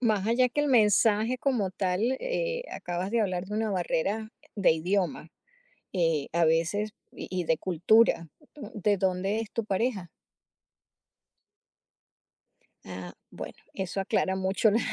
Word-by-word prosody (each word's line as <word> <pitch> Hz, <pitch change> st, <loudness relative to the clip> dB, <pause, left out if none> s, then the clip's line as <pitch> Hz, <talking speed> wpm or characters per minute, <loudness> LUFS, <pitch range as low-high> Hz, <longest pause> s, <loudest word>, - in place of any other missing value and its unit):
más 215 Hz, -5 st, +1 dB
allá 250 Hz, +2 st, +3 dB
que 290 Hz, -, 0 dB
el 295 Hz, -, +1 dB
mensaje 220 Hz, 0 st, +4 dB
como 235 Hz, -9 st, 0 dB
tal, 185 Hz, +1 st, -1 dB, 0.2 s
eh, -, -, -2 dB
acabas 180 Hz, +2 st, -4 dB
de 235 Hz, -1 st, +2 dB
hablar 185 Hz, -2 st, -2 dB
de 210 Hz, -, -5 dB
una 220 Hz, 0 st, 0 dB
barrera 195 Hz, +4 st, -1 dB, 0.3 s
de 200 Hz, -5 st, +4 dB
idioma, 170 Hz, -1 st, -1 dB, 0.6 s
eh, 165 Hz, -6 st, +1 dB
a 170 Hz, 0 st, +3 dB
veces 170 Hz, +7 st, +1 dB, 0.2 s
y -, -, -8 dB
y 185 Hz, -1 st, -2 dB
de 160 Hz, -1 st, +1 dB
cultura. 180 Hz, 0 st, +3 dB, 0.4 s
¿De 205 Hz, -1 st, +1 dB
dónde 190 Hz, +3 st, 0 dB
es 220 Hz, -, -8 dB
tu 230 Hz, -, -2 dB
pareja? 200 Hz, -2 st, -1 dB, 2.8 s
Ah, 90 Hz, -1 st, -8 dB, 0.2 s
bueno, -, -, -8 dB, 0.2 s
eso 190 Hz, 0 st, -3 dB
aclara 190 Hz, 0 st, 0 dB
mucho 190 Hz, +3 st, +2 dB
la 215 Hz, +3 st, +2 dB
195 Hz, 135 wpm, -28 LUFS, 180-220 Hz, 2.8 s, mensaje